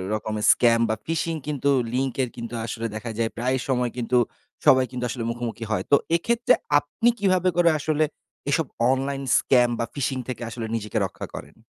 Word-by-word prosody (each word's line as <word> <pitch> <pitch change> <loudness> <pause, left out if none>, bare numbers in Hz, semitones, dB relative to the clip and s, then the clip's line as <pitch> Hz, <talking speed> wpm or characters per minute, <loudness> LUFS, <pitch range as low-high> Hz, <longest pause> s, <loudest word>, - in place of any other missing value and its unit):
রকমের 110 0 -3
স্ক্যাম 115 -1 +4
বা 110 - +1
phishing 165 0 -1
কিন্তু 140 -1 0 0.2
লিংকের 130 0 0
কিন্তু 120 -1 -7
আসলে 115 0 -4
দেখা 110 +1 -5
যায় 115 -1 +1
প্রায়ই 130 +1 0
সময় 125 -2 +1
কিন্তু 125 +1 +1 0.5
সবাই 130 -1 +6
কিন্তু 125 -1 -4
আসলে 120 -1 -4
মুখোমুখি 115 -1 -5
হয়। - - 0
তো 140 - +9 0.2
এক্ষেত্রে 235 +7 +2 0.3
আপনি 225 +12 0
কীভাবে 185 -2 +3
করে 175 -1 +5
আসলে 155 +1 +1 0.5
এসব 160 +2 +2 0.3
অনলাইন 135 +1 -1
স্ক্যাম 125 -2 +4
বা 115 - 0
ফিশিং 135 -2 -1
থেকে 130 -2 -5
আসলে 115 -1 -5
নিজেকে 105 -2 -3
রক্ষা - - -7
করেন? - - -9
130 Hz, 175 wpm, -24 LUFS, 115-150 Hz, 0.5 s, তো